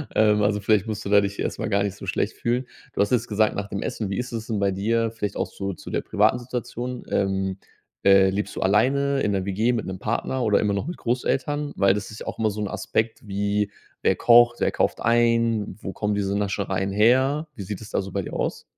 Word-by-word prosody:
Ähm, 105 -1 +4
also 105 0 +2
vielleicht 105 0 +2
musst 110 0 -4
du - - -3
da 100 0 +6
dich 100 0 -4
erst - - -2
mal - - -2
gar 100 -1 +2
nicht 100 -1 -2
so - - -9
schlecht - - -1
fühlen. 120 +2 -1 0.3
Du - - -6
hast 100 - +1
jetzt 115 -2 +1
gesagt, 110 0 +1
nach 100 0 -3
dem 100 - -4
Essen. 105 -3 -3
Wie 95 - -2
ist 125 0 -3
es 115 -1 -4
denn 110 -3 -1
bei 100 -1 +2
dir, 115 +4 0
vielleicht 105 -3 -4
auch - - 0
so 100 0 -5
zu - - -10
der - - -1
privaten - - +2
Situation, 125 0 -5
ähm, 95 -1 0 0.5
äh, 95 -1 +6
lebst 100 +2 -2
du - - -4
alleine 135 +8 +2
in 105 - +1
ner 95 -2 -1
WG 105 +5 +1
mit 115 - -2
'nem 95 -1 -5
Partner 115 +4 -1
oder 105 -3 +3
immer 105 -1 +1
noch 100 +6 -2
mit 175 - -5
Großeltern? 145 +4 -1
Weil 100 -1 +4
das 105 0 -4
ist 110 - -9
ja - - -8
auch - - -5
immer 110 -1 +2
so 105 - -6
'n 105 - -1
Aspekt 110 +3 -2
wie: 100 +1 0 0.3
Wer - - +3
kocht, 120 0 +6
wer - - +2
kauft - - 0
ein? 115 -3 +2
Wo 95 - -5
kommen 105 -1 -1
diese 100 0 0
Naschereien 95 -1 -1
her? 130 +9 +3
Wie 110 - -7
sieht 95 +1 -5
es 110 - -10
da - - +1
so 95 0 -8
bei 100 +1 -2
dir - - -8
aus? - - -2
105 Hz, 250 wpm, -24 LUFS, 100-115 Hz, 0.5 s, da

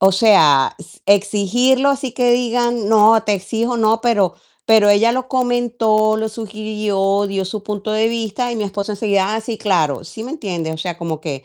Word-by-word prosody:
O 190 - +5
sea, 185 -10 +4
s 165 - -16
exigirlo, 210 +7 +2
así 270 -2 -3
que 245 0 +2
digan: 240 -2 0
"No, 220 0 +5
te 210 -2 0
exijo, 225 +5 -3
no", 225 0 +2
pero 205 -7 +1 0.3
pero 220 -2 +4
ella 205 +3 +4
lo 255 +1 -2
comentó, 240 -4 +1
lo 220 0 -2
sugirió, 210 -2 -2
dio 195 -1 -3
su 200 +2 -6
punto 210 0 -5
de 215 +1 +1
vista, 230 +1 -3
y 235 - -4
mi 215 - -2
esposo 200 +1 -4
enseguida: 200 -1 0
"Ah, 220 - -2
sí, 225 0 -6
claro", 165 -9 0
¿sí 220 - -9
me 250 - -7
entiendes? 175 - -4
O - - -9
sea, 175 +1 -4
como 165 -3 -5
que 140 -4 -6
215 Hz, 195 wpm, -18 LUFS, 195-230 Hz, 0.3 s, O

